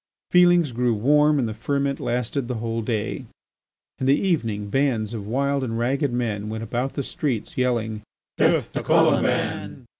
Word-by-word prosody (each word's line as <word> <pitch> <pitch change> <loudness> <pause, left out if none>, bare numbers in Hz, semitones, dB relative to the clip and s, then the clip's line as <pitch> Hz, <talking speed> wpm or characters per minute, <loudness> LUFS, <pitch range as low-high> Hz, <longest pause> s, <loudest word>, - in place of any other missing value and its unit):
Feelings 175 -4 +5
grew 120 0 +1
warm 150 +6 +3
and 125 -4 +1
the 110 - -4
ferment 140 +4 -1
lasted 125 +2 -2
the 125 - -3
whole 115 0 -3
day. 110 +3 -3 0.7
In 130 - -1
the 140 +2 +4
evening 115 - -1
bands 120 -5 0
of 105 -3 -6
wild 140 +3 0
and 115 -3 -3
ragged 135 +4 0
men 110 -4 -2
went 110 +1 -4
about 125 +4 -2
the 140 - -3
streets 130 -5 -3
yelling: 115 -4 -1 0.3
"Death - - +2
to - - -2
Colomban!" - - +1
125 Hz, 160 wpm, -23 LUFS, 110-140 Hz, 0.7 s, Feelings